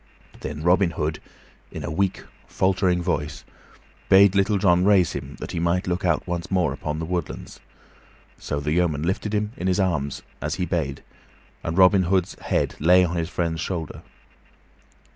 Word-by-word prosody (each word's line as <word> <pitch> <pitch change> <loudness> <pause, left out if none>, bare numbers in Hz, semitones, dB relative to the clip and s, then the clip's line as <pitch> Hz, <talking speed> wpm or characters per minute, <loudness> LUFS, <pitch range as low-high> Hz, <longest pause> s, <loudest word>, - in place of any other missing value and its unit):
Then 75 +2 -6
Robin 90 +1 +4
Hood, 75 0 -1 0.5
in - - -6
a - - -4
weak, 95 +4 -1 0.2
faltering 95 -2 +1
voice, 75 -5 -2 0.7
bade 95 0 +7
Little 100 +1 +2
John 90 -2 +3
raise 95 -3 +4
him 70 +1 -6
that - - -6
he - - -3
might 85 +3 +1
look 90 +2 -2
out 85 -3 +1
once 85 0 -4
more 90 -2 +1
upon 75 0 -4
the 80 - -3
woodlands; 85 -1 -5 0.8
so 70 - -3
the 75 +1 -2
yeoman 80 -3 +1
lifted 95 +4 -1
him 105 0 -1
in 90 - -3
his 95 +1 +1
arms, 85 -8 -1 0.2
as - - -2
he 90 - -1
bade, 75 -7 -2 0.6
and 85 +1 -3
Robin 95 0 +6
Hood's 95 0 +1
head - - -1
lay 90 +4 +5
on 85 0 -3
his 85 -1 -2
friend's 85 -2 -2
shoulder. 85 -4 -4
90 Hz, 170 wpm, -24 LUFS, 80-95 Hz, 0.8 s, bade